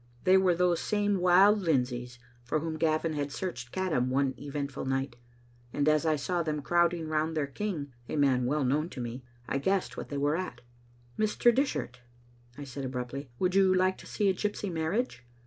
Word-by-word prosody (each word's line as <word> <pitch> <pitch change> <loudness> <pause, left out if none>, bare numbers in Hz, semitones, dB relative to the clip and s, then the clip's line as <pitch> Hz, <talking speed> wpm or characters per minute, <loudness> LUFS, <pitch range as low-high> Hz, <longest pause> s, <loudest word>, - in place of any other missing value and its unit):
They 185 - +5
were 190 -2 +4
those 175 -1 +2
same 205 -2 0
wild 190 +4 +6
Lindsays, 125 -7 -1 0.3
for 125 +6 -1
whom 160 +1 -3
Gavin 155 0 +1
had 145 -1 -2
searched 125 -8 -5
Caddam 165 -10 0
one 135 0 +1
■eventful 140 -2 -5
night, 135 -1 -1 0.6
and 145 +3 0
as 155 +1 +3
I 155 - +3
saw 175 +4 -1
them 150 -3 -2
crowding 170 0 +2
round 155 +1 -1
their 150 - +1
king, 145 -2 -4 0.2
a - - -2
man 130 -4 +3
well 145 +2 +1
known 150 +6 +1
to - - -3
me, 120 +1 -5 0.2
I 140 - -1
guessed 190 +6 0
what - - -6
they 145 - -3
were 145 +2 +1
at. 185 +2 -4 0.6
"Mr. 215 +3 +3
Dishart," 225 - -1 0.6
I 145 - -6
said 140 0 -7
abruptly, 130 +1 -5
"would 180 +5 +1
you 195 -1 +5
like 185 0 +2
to - - -12
see 210 - 0
a 190 - +4
gypsy 205 0 -3
marriage? 165 - -2
155 Hz, 190 wpm, -29 LUFS, 140-185 Hz, 0.6 s, wild